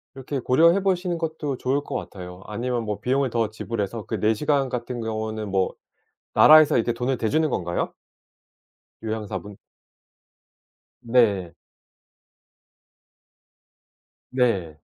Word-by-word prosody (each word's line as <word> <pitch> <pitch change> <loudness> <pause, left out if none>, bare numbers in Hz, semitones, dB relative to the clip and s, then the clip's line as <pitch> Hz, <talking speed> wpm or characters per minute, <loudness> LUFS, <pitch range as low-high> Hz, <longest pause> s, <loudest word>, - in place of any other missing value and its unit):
이렇게 135 +1 -4
고려해 165 +10 +4
보시는 180 -2 0
것도 160 -4 -3
좋을 135 +3 0
것 - - -6
같아요. 90 -1 -7
아니면 120 +3 -2
뭐 105 -1 -3
비용을 135 +1 +1
더 115 -2 0
지불해서 110 0 -4
그 - - -3
4 110 +1 +3
시간 140 +2 +1
같은 120 0 -4
경우는 110 -1 -3
뭐 95 -1 +1 0.6
나라에서 155 -1 +7
이렇게 120 +1 +1
돈을 125 +2 -1
대주는 155 +9 +1
건가요? 85 -7 -2 1.1
요양사분. 105 -3 -5 1.5
네. 105 -8 +2 2.8
네. 100 - 0
120 Hz, 235 characters per minute, -24 LUFS, 105-135 Hz, 2.8 s, 나라에서